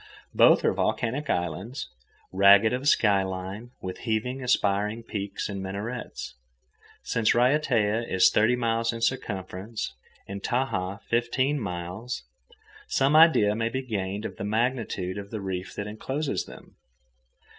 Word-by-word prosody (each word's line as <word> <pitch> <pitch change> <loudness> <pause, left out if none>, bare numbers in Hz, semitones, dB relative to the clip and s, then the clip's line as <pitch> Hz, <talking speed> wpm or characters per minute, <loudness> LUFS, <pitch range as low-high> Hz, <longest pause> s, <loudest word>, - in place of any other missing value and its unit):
Both - - +5
are - - +3
volcanic 135 +6 -1
islands, 95 +8 -2 0.5
ragged 100 +4 +6
of 130 +3 -2
sky 100 -7 +4
line, 95 +4 -5
with 90 0 -5
heaven 125 +3 -2
aspiring 105 -2 +1
peaks 100 -3 -4
and 100 -2 -5
minarets. 100 +6 -5 0.7
Since 115 -2 +1
Raiatea 120 -4 +2
is 95 -1 +5
thirty 110 +4 +3
miles 115 -1 0
in 115 -1 -6
circumference, 105 -3 -3 0.3
and 100 0 -6
Tahaa 100 -5 -1
fifteen 130 +5 0
miles, 95 +4 -5 0.6
some 135 +3 +2
idea 155 -11 +6
may 115 +1 -1
be 130 +3 -3
gained 100 -3 -3
of - - -6
the - - -5
magnitude 110 -4 -1
of 100 0 -8
the 110 - -5
reef 95 -1 -5
that 105 - -4
encloses 130 +8 -3
them. - - -14
110 Hz, 135 wpm, -26 LUFS, 100-125 Hz, 0.7 s, ragged